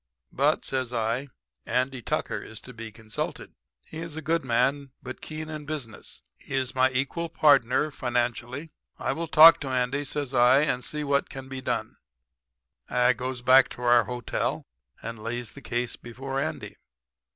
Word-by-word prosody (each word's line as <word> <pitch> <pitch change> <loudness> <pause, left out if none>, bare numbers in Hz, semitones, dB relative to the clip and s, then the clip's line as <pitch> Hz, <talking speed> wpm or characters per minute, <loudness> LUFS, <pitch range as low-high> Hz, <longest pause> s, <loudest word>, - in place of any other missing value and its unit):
But,' - - +1
says 130 -2 -2
I, 115 +3 -1 0.4
'Andy 130 - -1
Tucker - - -2
is 110 - -8
to 125 - -11
be 115 -1 -8
consulted. 110 -1 -5 0.3
"'He 160 - -8
is 165 -2 -5
a 160 - -5
good 165 0 +1
man, 135 +2 +1
but 130 0 -7
keen 155 0 -6
in 155 -1 -6
business. 140 -8 -7 0.2
He 140 - -6
is 130 -1 -1
my 130 0 +4
equal 140 +6 -2
partner 145 -1 +4
financially. 125 +3 -2 0.3
I - - -1
will 165 +1 -4
talk 165 0 +9
to 140 - -5
Andy,' 130 +3 0
says 140 -1 -3
I, 125 +2 +6
'and 125 -4 0
see 150 -1 -3
what 140 -1 +1
can 135 0 -8
be 135 0 -5
done.' - - -3 0.9
"I 125 0 +4
goes 125 0 -5
back 130 +1 +6
to 125 - -9
our 120 -1 +5
hotel 125 -2 -2 0.4
and 115 -1 -6
lays 120 +1 -4
the 140 - -11
case 120 -2 -2
before 135 +3 -5
Andy. 155 +3 -4
130 Hz, 170 wpm, -27 LUFS, 120-145 Hz, 0.9 s, talk